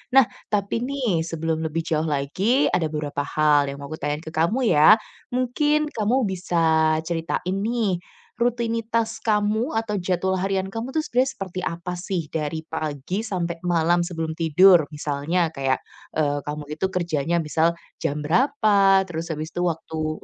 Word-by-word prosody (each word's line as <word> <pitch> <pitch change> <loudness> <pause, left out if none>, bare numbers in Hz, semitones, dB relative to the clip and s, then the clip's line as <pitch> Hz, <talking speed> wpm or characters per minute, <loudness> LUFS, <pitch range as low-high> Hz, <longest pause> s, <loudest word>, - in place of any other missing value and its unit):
Nah, 270 - +9 0.2
tapi 205 +1 0
nih, 250 -11 0
sebelum 165 -1 -2
lebih 165 +1 -2
jauh 160 -1 0
lagi, 185 - +1
ada 170 -3 +1
beberapa 150 -2 -4 0.2
hal 150 -2 +4
yang 140 - -4
mau 140 - -8
aku 155 - -6
tanyain 145 +2 -2
ke 160 - -8
kamu 215 +11 +1
ya. 155 +8 +8 0.4
Mungkin 295 +4 +1
kamu 235 +4 +1
bisa 185 -3 -3 0.5
ceritain 170 +2 -2
nih, 215 -4 0 0.4
rutinitas 230 -1 0
kamu 215 +4 0
atau 215 -3 -1
jadwal 185 +1 0
harian 190 0 -1
kamu 225 +3 -4
tuh 310 - +2
sebenarnya 260 +1 +1
seperti 185 -2 -5
apa 170 +1 -4
sih? 175 -5 -3
Dari 160 0 -3
pagi, 155 +4 -3
sampai 175 -6 -3
malam 175 0 +3
sebelum 165 -3 -3
tidur. 165 0 +5
Misalnya 155 +4 -1
kayak, 135 -3 -1 0.3
eee, 145 -2 +1
kamu 150 0 -4 0.2
itu - - +1
kerjanya 170 -3 -1
misal 165 +2 +1 0.2
jam 150 +1 -2
berapa, 200 - +4
terus 165 -2 -5
habis 155 0 -4
itu - - -5
waktu 155 -1 -3
175 Hz, 155 wpm, -23 LUFS, 155-215 Hz, 0.5 s, Nah